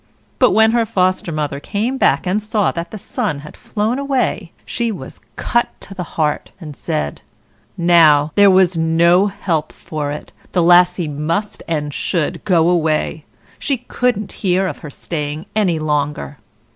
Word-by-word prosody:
But 250 Hz, -, +6 dB
when 220 Hz, +2 st, +4 dB
her 235 Hz, 0 st, +2 dB
Foster 185 Hz, -4 st, 0 dB
mother 150 Hz, -2 st, -2 dB
came 225 Hz, -, -2 dB
back -, -, +3 dB
and 190 Hz, +4 st, 0 dB
saw 210 Hz, -1 st, 0 dB
that 170 Hz, 0 st, -5 dB
the 215 Hz, -, -7 dB
sun 210 Hz, -, -3 dB
had 150 Hz, -, -11 dB
flown 220 Hz, +5 st, -2 dB
away, 260 Hz, -10 st, -1 dB
she 235 Hz, -1 st, -2 dB
was 155 Hz, -11 st, -9 dB
cut 240 Hz, 0 st, -1 dB
to 195 Hz, -, -9 dB
the 190 Hz, -, -5 dB, 0.2 s
heart, 150 Hz, -2 st, 0 dB
and 155 Hz, -5 st, -9 dB
said, 75 Hz, -, -3 dB, 0.6 s
"Now, 160 Hz, -4 st, +5 dB
there 205 Hz, -1 st, +6 dB
was 185 Hz, -1 st, +4 dB
no 170 Hz, +4 st, +3 dB
help 170 Hz, -6 st, -2 dB
for 150 Hz, -2 st, -5 dB
it, 150 Hz, -, -7 dB, 0.2 s
the 175 Hz, -, +3 dB
Lassie 175 Hz, 0 st, +5 dB
must 160 Hz, +8 st, -3 dB
and 150 Hz, -3 st, -2 dB
should 165 Hz, -1 st, -2 dB
go 170 Hz, -4 st, +3 dB
away; 160 Hz, -3 st, 0 dB, 0.3 s
she 275 Hz, -, -1 dB
couldn't 245 Hz, -2 st, -1 dB
hear 190 Hz, -1 st, +2 dB
of 185 Hz, -, -4 dB
her 150 Hz, -, -8 dB
staying 150 Hz, +1 st, -5 dB
any 190 Hz, -6 st, +2 dB
longer." 150 Hz, -2 st, -2 dB
175 Hz, 160 wpm, -18 LUFS, 155-205 Hz, 0.6 s, But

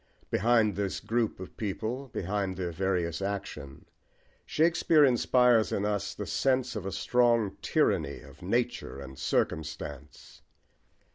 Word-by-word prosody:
Behind 110 Hz, -2 st, +3 dB
this 100 Hz, -1 st, -2 dB
group 115 Hz, -3 st, -1 dB
of 95 Hz, -, -9 dB
people, 110 Hz, +6 st, -3 dB
behind 95 Hz, -3 st, -2 dB
their 90 Hz, -2 st, -2 dB
various 90 Hz, -1 st, -1 dB
action, 95 Hz, -9 st, -5 dB, 0.6 s
Shakespeare 160 Hz, -1 st, +4 dB
inspires 125 Hz, -2 st, +4 dB
in 100 Hz, -, 0 dB
us 105 Hz, -1 st, -2 dB
the -, -, -5 dB
sense 130 Hz, -3 st, 0 dB
of 100 Hz, -3 st, -4 dB
a -, -, -3 dB
strong 115 Hz, 0 st, +2 dB
tyranny 70 Hz, -, +1 dB
of -, -, -15 dB
nature -, -, -1 dB
and 65 Hz, -1 st, -9 dB
circumstance. 75 Hz, -2 st, -3 dB
100 Hz, 125 wpm, -29 LUFS, 90-120 Hz, 0.6 s, Shakespeare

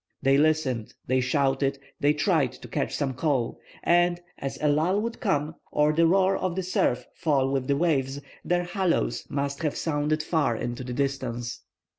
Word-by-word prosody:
They 135 Hz, 0 st, +5 dB
listened, 145 Hz, -6 st, +1 dB
they 130 Hz, +1 st, +2 dB
shouted, 135 Hz, +1 st, +1 dB, 0.2 s
they 145 Hz, -, +4 dB
tried 150 Hz, -, +1 dB
to -, -, -11 dB
catch -, -, -2 dB
some 135 Hz, -2 st, -1 dB
call, 130 Hz, -3 st, -1 dB, 0.2 s
and, 175 Hz, 0 st, +3 dB, 0.2 s
as 135 Hz, 0 st, -4 dB
a 150 Hz, -, +1 dB
lull 160 Hz, +7 st, +2 dB
would 230 Hz, +2 st, -3 dB
come, 155 Hz, -, 0 dB, 0.2 s
or 150 Hz, +1 st, +3 dB
the 165 Hz, +1 st, +4 dB
roar 190 Hz, +2 st, +4 dB
of 185 Hz, -2 st, -2 dB
the 190 Hz, -, -1 dB
surf 125 Hz, -8 st, 0 dB
fall 135 Hz, -4 st, +1 dB
with 135 Hz, -2 st, -1 dB
the 140 Hz, -1 st, +2 dB
waves, 140 Hz, -4 st, +1 dB, 0.2 s
their 175 Hz, 0 st, +1 dB
hallooes 175 Hz, -, 0 dB
must 140 Hz, +1 st, -2 dB
have 150 Hz, -3 st, -1 dB
sounded 155 Hz, 0 st, 0 dB
far 150 Hz, -7 st, +1 dB
into 120 Hz, +2 st, -4 dB
the 125 Hz, 0 st, -5 dB
distance. 125 Hz, -3 st, -2 dB
145 Hz, 175 wpm, -26 LUFS, 135-165 Hz, 0.2 s, They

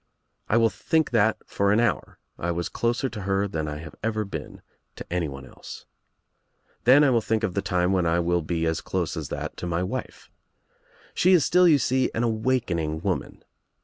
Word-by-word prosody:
I 115 Hz, -, +3 dB
will 115 Hz, -1 st, +4 dB
think 160 Hz, -2 st, 0 dB
that 110 Hz, -2 st, +3 dB
for 100 Hz, 0 st, 0 dB
an 105 Hz, -, +3 dB
hour 115 Hz, -5 st, -1 dB, 0.2 s
I 85 Hz, -, -2 dB
was 85 Hz, 0 st, -2 dB
closer 120 Hz, +3 st, -1 dB
to 110 Hz, -5 st, -7 dB
her 95 Hz, +1 st, 0 dB
than 80 Hz, -5 st, -3 dB
I 75 Hz, 0 st, -4 dB
have 80 Hz, -1 st, -9 dB
ever 110 Hz, 0 st, -1 dB
been 100 Hz, -, -8 dB, 0.3 s
to -, -, -8 dB
anyone 70 Hz, -7 st, -3 dB
else. -, -, -11 dB, 1.0 s
Then 135 Hz, +5 st, +7 dB
I 140 Hz, -, +4 dB
will 115 Hz, -2 st, +3 dB
think 110 Hz, 0 st, -1 dB
of 100 Hz, -5 st, -1 dB
the 100 Hz, -, 0 dB
time 90 Hz, -1 st, 0 dB
when 90 Hz, -3 st, +2 dB
I 80 Hz, +1 st, +2 dB
will 85 Hz, 0 st, +1 dB
be 80 Hz, +1 st, -2 dB
as 80 Hz, -1 st, -1 dB
close -, -, -2 dB
as -, -, -5 dB
that -, -, -5 dB
to 90 Hz, -, -5 dB
my 85 Hz, +1 st, -1 dB
wife. 90 Hz, -, -6 dB, 0.8 s
She 185 Hz, +2 st, +4 dB
is 170 Hz, -5 st, +5 dB
still, 180 Hz, 0 st, +5 dB
you 155 Hz, -4 st, +6 dB
see, 130 Hz, 0 st, +1 dB
an 115 Hz, -, 0 dB
awakening 110 Hz, -10 st, -1 dB
■ -, -, -20 dB
woman. -, -, -3 dB
100 Hz, 205 wpm, -25 LUFS, 85-120 Hz, 1.0 s, Then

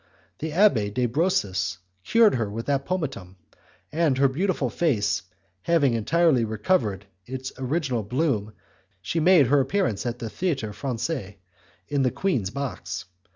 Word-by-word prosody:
The 160 Hz, -, -3 dB
Abbé 150 Hz, -, +3 dB
de 125 Hz, +4 st, 0 dB
Brosses 100 Hz, -, 0 dB, 0.3 s
cured 230 Hz, -, +5 dB
her 115 Hz, -5 st, -1 dB
with 115 Hz, +3 st, -5 dB
that 140 Hz, -1 st, -1 dB
pomatum, 135 Hz, -, -3 dB, 0.6 s
and 155 Hz, -4 st, +2 dB
her 140 Hz, +1 st, +5 dB
beautiful 150 Hz, -, -1 dB
face 125 Hz, -12 st, +1 dB, 0.4 s
having 145 Hz, -, +2 dB
entirely 135 Hz, +3 st, +3 dB
recovered 110 Hz, -, 0 dB, 0.2 s
it 130 Hz, +1 st, -5 dB
original 130 Hz, -2 st, -1 dB
bloom 110 Hz, -2 st, -1 dB, 0.5 s
she 165 Hz, -, -1 dB
made 165 Hz, -2 st, +6 dB
her 140 Hz, +4 st, +4 dB
appearance 130 Hz, -, 0 dB
at 120 Hz, 0 st, -3 dB
the 115 Hz, -, -5 dB
Theatre 135 Hz, -, -2 dB
Francais, 120 Hz, -, -4 dB, 0.5 s
in 140 Hz, +3 st, 0 dB
the 130 Hz, -, +3 dB
queen's 125 Hz, -, -1 dB
box. 135 Hz, -5 st, -5 dB
130 Hz, 140 wpm, -25 LUFS, 110-160 Hz, 0.6 s, made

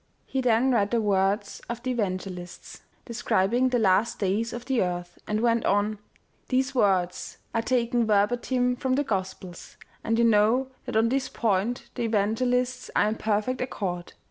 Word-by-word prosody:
He 265 Hz, -, -2 dB
then 245 Hz, +1 st, +3 dB
read 205 Hz, -5 st, +2 dB
the 235 Hz, -, +1 dB
words 200 Hz, 0 st, 0 dB
of 235 Hz, 0 st, -5 dB
the 255 Hz, -, -1 dB
evangelists* 185 Hz, -5 st, -5 dB, 0.2 s
describing 235 Hz, +1 st, +1 dB
the 250 Hz, -, +1 dB
last 215 Hz, +1 st, +2 dB
days 210 Hz, +4 st, 0 dB
of 240 Hz, 0 st, -7 dB
the 260 Hz, -3 st, +1 dB
earth, 175 Hz, -1 st, -3 dB
and 210 Hz, +1 st, -1 dB
went 230 Hz, -1 st, +2 dB
on: 205 Hz, +2 st, +2 dB
u 215 Hz, -, -8 dB, 0.5 s
These 265 Hz, +1 st, +1 dB
words 190 Hz, -7 st, 0 dB, 0.2 s
are 230 Hz, -, +1 dB
taken 240 Hz, -1 st, +1 dB
verbatim 245 Hz, +4 st, +1 dB
from 260 Hz, 0 st, -1 dB
the 290 Hz, -, +1 dB
Gospels, 190 Hz, -5 st, -5 dB, 0.3 s
and 225 Hz, 0 st, 0 dB
you 235 Hz, -, +4 dB
know 230 Hz, +4 st, +3 dB, 0.2 s
that -, -, -5 dB
on 225 Hz, +1 st, +3 dB
this 265 Hz, +1 st, -1 dB
point 220 Hz, +2 st, 0 dB
the 245 Hz, -, -5 dB
evangelists 245 Hz, +3 st, 0 dB
are 210 Hz, -, +3 dB
in 215 Hz, -, -2 dB
perfect 215 Hz, +4 st, -1 dB
accord. 180 Hz, -8 st, -4 dB
225 Hz, 170 wpm, -26 LUFS, 200-250 Hz, 0.5 s, you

